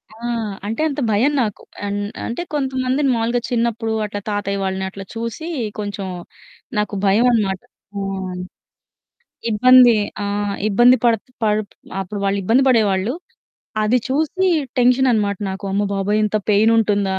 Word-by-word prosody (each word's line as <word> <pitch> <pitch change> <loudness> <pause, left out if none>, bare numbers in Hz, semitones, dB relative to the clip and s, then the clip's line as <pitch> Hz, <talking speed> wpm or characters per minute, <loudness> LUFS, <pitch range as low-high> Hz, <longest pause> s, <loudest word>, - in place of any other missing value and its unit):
ఆ! - - -16 0.5
అంటే 225 +7 -2
అంత 285 - -4
భయం 240 +8 +3
నాకు. 210 -3 -5 0.2
అన్ 205 0 -2 0.3
అంటే 235 +9 -3
కొంతమందిని 265 0 0
మాములుగా 235 +2 0
చిన్నప్పుడు 230 -2 0
అట్లా 205 0 -5
తాతయ్య 200 -1 -2
వాళ్ళని 190 0 -2
అట్లా 195 0 -9
చూసి 230 +8 -5 0.3
కొంచెం 200 -2 -4 0.7
నాకు 210 0 -1
భయమనమాట. 205 -2 +2 0.3
అవును. 190 -2 -4 1.1
ఇబ్బంది. 245 +1 +7 0.3
ఆ! - - -2 0.4
ఇబ్బంది 240 +5 +6
పడుతు 230 +1 +1
పడు 215 0 +2 0.4
అప్పుడు 200 +2 -5
వాళ్ళు 195 0 +1
ఇబ్బంది 230 +8 +3
బడేవాళ్ళు. 215 -1 +2 0.7
అది 235 +4 +3
చూసి 315 +7 +1 0.3
టెన్షన్ 250 +2 +4
అన్నమాట 205 -3 0
నాకు. 190 +1 -6
అమ్మబాబోయ్! 200 +1 0
ఇంత 215 0 0
పెయిన్ 215 +3 +4
ఉంటుందా? 200 -3 +1
215 Hz, 130 wpm, -20 LUFS, 200-245 Hz, 1.1 s, ఇబ్బంది